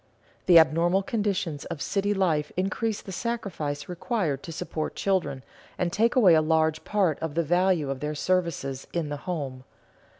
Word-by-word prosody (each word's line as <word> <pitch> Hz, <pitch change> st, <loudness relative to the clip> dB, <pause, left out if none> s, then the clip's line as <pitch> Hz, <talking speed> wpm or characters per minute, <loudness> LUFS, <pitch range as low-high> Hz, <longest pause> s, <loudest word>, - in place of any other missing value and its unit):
The 175 Hz, -2 st, +8 dB
abnormal 170 Hz, +4 st, +4 dB
conditions 195 Hz, -8 st, -2 dB
of 170 Hz, -4 st, -6 dB
city 200 Hz, +6 st, 0 dB
life 165 Hz, -7 st, +1 dB
increase 200 Hz, +3 st, -1 dB
the 195 Hz, -, -8 dB
sacrifice 185 Hz, -10 st, -3 dB
required 180 Hz, -, -2 dB
to 165 Hz, -, -8 dB
support 155 Hz, -1 st, -4 dB
children, 185 Hz, -9 st, -1 dB, 0.3 s
and 175 Hz, -2 st, -1 dB
take 230 Hz, +3 st, +2 dB
away 205 Hz, -9 st, +6 dB
a 160 Hz, -, +5 dB
large 160 Hz, 0 st, +1 dB
part 190 Hz, -8 st, +1 dB
of 160 Hz, -2 st, -4 dB
the 170 Hz, -, +2 dB
value 175 Hz, -3 st, +2 dB
of 135 Hz, -, -4 dB
their 150 Hz, +1 st, -3 dB
services 155 Hz, -6 st, -1 dB
in 165 Hz, -4 st, -1 dB
the 145 Hz, -, -3 dB
home. 135 Hz, -7 st, -4 dB
170 Hz, 165 wpm, -26 LUFS, 150-190 Hz, 0.3 s, The